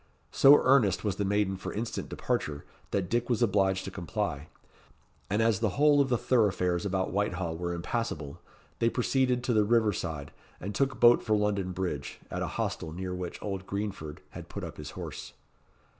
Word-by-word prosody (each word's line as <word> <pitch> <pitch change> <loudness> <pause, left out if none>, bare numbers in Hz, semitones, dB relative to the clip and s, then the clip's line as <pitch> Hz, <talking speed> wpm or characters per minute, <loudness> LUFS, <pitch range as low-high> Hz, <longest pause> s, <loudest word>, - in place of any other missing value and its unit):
So 140 +2 +7
earnest 125 -9 +4
was 105 -3 -1
the 100 - 0
maiden 100 -1 +1
for - - -5
instant 115 +2 -4
departure, 75 -1 -2 0.2
that 95 -3 -1
Dick 120 +4 0
was 120 -1 +2
obliged 95 -3 +2
to 95 - -5
comply; 75 -5 -3 0.8
and 105 +3 +2
as 110 -3 +2
the 110 -1 -1
whole 145 0 +5
of 135 - +1
the 120 - +2
thoroughfares 100 -7 +1
about 95 -1 -1
Whitehall 90 -4 -1
were 85 +1 -3
impassable, 85 -5 -3 0.4
they 115 - +3
proceeded 125 0 +1
to 120 - +1
the 105 -1 +4
river 110 -1 +3
side, 80 -5 -4 0.3
and 100 +3 -5
took 135 +5 0
boat 120 0 +7
for 110 -2 +1
London 100 -3 0
Bridge, 90 -6 -4
at - - -3
a - - -1
hostel 80 - -2
near 90 +2 -4
which 90 -1 -5
old 95 -2 -4
Greenford 100 -7 -4
had - - -9
put - - -6
up - - -7
his - - -7
horse. - - -7
100 Hz, 185 wpm, -29 LUFS, 90-115 Hz, 0.8 s, So